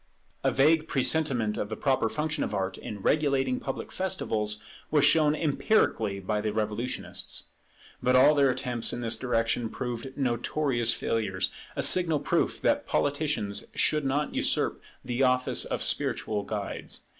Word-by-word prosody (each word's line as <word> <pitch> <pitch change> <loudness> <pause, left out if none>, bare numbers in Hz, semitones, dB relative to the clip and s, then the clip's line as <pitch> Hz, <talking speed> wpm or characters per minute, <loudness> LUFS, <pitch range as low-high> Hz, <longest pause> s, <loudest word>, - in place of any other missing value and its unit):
A - - +3
vague 155 +3 +3
presentiment 130 -6 +1
of 105 - -3
the 110 - -3
proper 130 -5 +1
function 150 +2 -2
of - - -3
Art 95 -1 -2
in 100 -2 -7
regulating 135 -4 +1
public 135 - -5
festivals 110 - -1 0.3
was 145 -2 +4
shown 150 0 +4
empirically 145 - +1
by 105 +2 -2
the 105 0 -1
Revolutionists. 110 +3 -3 0.5
But 125 +1 +3
all 140 +4 +7
their 140 -2 +4
attempts 125 -2 0
in 120 - -4
this 115 -1 +1
direction 115 -1 0
proved 125 +2 -5
notorious 120 -1 0
failures; 100 -6 -1 0.2
a - - 0
signal 165 -5 +4
proof - - 0
that - - +1
politicians 145 -8 -1
should 150 -1 +2
not 140 +2 -1
usurp - - 0 0.2
the 125 +1 -2
office 125 -1 +2
of - - -3
spiritual 105 -1 0
guides. 105 -2 -5
125 Hz, 145 wpm, -28 LUFS, 110-145 Hz, 0.5 s, all